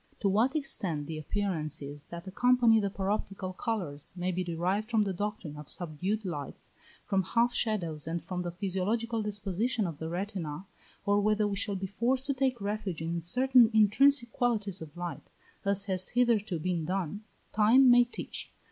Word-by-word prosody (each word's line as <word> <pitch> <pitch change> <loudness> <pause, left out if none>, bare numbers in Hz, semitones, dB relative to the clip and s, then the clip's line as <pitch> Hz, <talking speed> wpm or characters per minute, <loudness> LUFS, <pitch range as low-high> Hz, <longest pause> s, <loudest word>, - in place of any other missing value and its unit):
To 200 - +2
what 225 +9 +2
extent 185 - 0
the 155 +1 -5
appearances 155 -5 -3
that 170 0 -8
accompany 235 +3 +4
the 200 -2 0
paroptical 195 -1 -3
colours, 180 -11 -2
may 180 +1 -1
be 185 +1 -1
derived 180 +5 -1
from 225 -3 +3
the 195 -2 -2
doctrine 205 -5 -4
of 150 -1 -9
subdued 180 +6 -1
lights, 145 -6 -5 0.3
from 195 -1 +1
half 235 +6 +1
shadows, 170 -10 -1
and 165 +1 -1
from 180 +2 -5
the 175 - -3
physiological 205 +5 -1
disposition 210 +2 -1
of 165 -4 -5
the 160 - -4
retina, 180 -2 -4 0.4
or 205 0 +3
whether 215 +1 +2
we 200 - -2
shall 200 +1 -1
be 190 0 -3
forced 245 +7 0
to 280 - 0
take 260 -2 0
refuge 200 -5 -3
in 170 +1 -2
certain 250 +6 +4
intrinsic 235 +4 +5
qualities 210 -7 0
of 160 +1 -10
light, 175 -1 -6 0.4
as 200 0 +3
has 185 -2 -1
hitherto 230 -7 +2
been 170 0 -1
done, 190 +3 -2 0.3
time 230 +5 +6
may 245 0 +7
teach. 240 - -5
200 Hz, 170 wpm, -30 LUFS, 175-220 Hz, 0.4 s, may